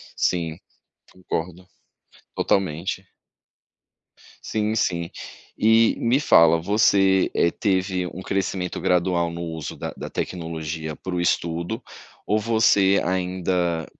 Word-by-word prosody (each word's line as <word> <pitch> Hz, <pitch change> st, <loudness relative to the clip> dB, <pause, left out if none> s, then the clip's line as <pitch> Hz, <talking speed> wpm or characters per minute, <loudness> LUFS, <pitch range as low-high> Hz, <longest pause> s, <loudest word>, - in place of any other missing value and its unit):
Sim, 85 Hz, -1 st, -1 dB, 0.5 s
concordo. 90 Hz, 0 st, -5 dB, 0.7 s
Totalmente. 95 Hz, +1 st, -1 dB, 1.4 s
Sim, 110 Hz, 0 st, -1 dB
sim. 85 Hz, -6 st, -1 dB, 0.4 s
E, 110 Hz, +1 st, +4 dB
me 120 Hz, +4 st, +2 dB
fala, 85 Hz, -, +5 dB
você, 95 Hz, 0 st, +3 dB
eh, 85 Hz, -, +3 dB
teve 95 Hz, -3 st, -1 dB
um 90 Hz, +1 st, -8 dB
crescimento 95 Hz, -2 st, -2 dB
gradual 90 Hz, -1 st, +1 dB
no 85 Hz, 0 st, -6 dB
uso 80 Hz, -3 st, -6 dB
da -, -, -5 dB
da -, -, -7 dB
tecnologia 80 Hz, -2 st, -4 dB
para 95 Hz, -, -7 dB
o 90 Hz, -, 0 dB
estudo, 85 Hz, +6 st, -1 dB, 0.4 s
ou 105 Hz, -, +1 dB
você 105 Hz, -3 st, +3 dB
ainda 90 Hz, -2 st, -1 dB
90 Hz, 105 wpm, -23 LUFS, 85-100 Hz, 1.4 s, fala